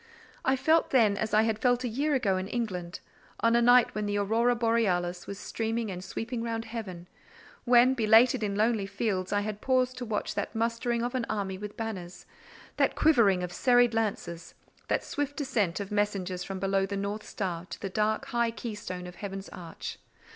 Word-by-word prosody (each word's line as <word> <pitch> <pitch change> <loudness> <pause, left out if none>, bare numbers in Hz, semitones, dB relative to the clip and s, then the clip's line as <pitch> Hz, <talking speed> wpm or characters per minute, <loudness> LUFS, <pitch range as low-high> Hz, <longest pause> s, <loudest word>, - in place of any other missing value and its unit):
I 265 - +3
felt 320 +5 +3
then 220 -6 +4
as 220 +1 -2
I 215 +1 +4
had 220 -1 0
felt 245 +1 +2
a - - 0
year 280 +6 0
ago 205 -7 +1
in 185 +1 -3
England—on 215 +1 -3
a 235 - +4
night 245 0 +5
when 210 -1 -2
the 205 0 0
aurora 225 +4 +2
borealis 190 -7 0
was 200 - -6
streaming 225 0 -3
and 180 0 -6
sweeping 230 +4 -4
round 230 -1 -3
heaven, 200 -7 -7 0.6
when, 245 +1 +6
belated 230 0 +5
in 205 -2 -1
lonely 215 -1 +1
fields, 195 -4 -2
I 205 0 +2
had 210 0 -5
paused 255 -1 +1
to 245 - -4
watch 215 -2 -2
that - - -4
mustering 230 +1 0
of 245 +1 -2
an 250 -3 -2
army 195 -3 -2
with 210 0 -7
banners—that 190 -6 -4
quivering 215 -12 +4
of 180 0 -5
serried 245 -2 +4
lances—that 200 -6 -3
swift 290 +1 -3
ascent 210 - 0
of 200 -1 -5
messengers 195 -3 -1
from 195 +1 -5
below 195 0 +1
the 200 0 -3
north 200 +2 -3
star 180 -3 -4
to - - -9
the 195 - -4
dark, 215 +3 0
high 235 -1 0
keystone 210 -5 -6
of 180 0 -10
heaven's 195 -1 -6
arch. 170 -2 -8
215 Hz, 185 wpm, -29 LUFS, 195-235 Hz, 0.6 s, when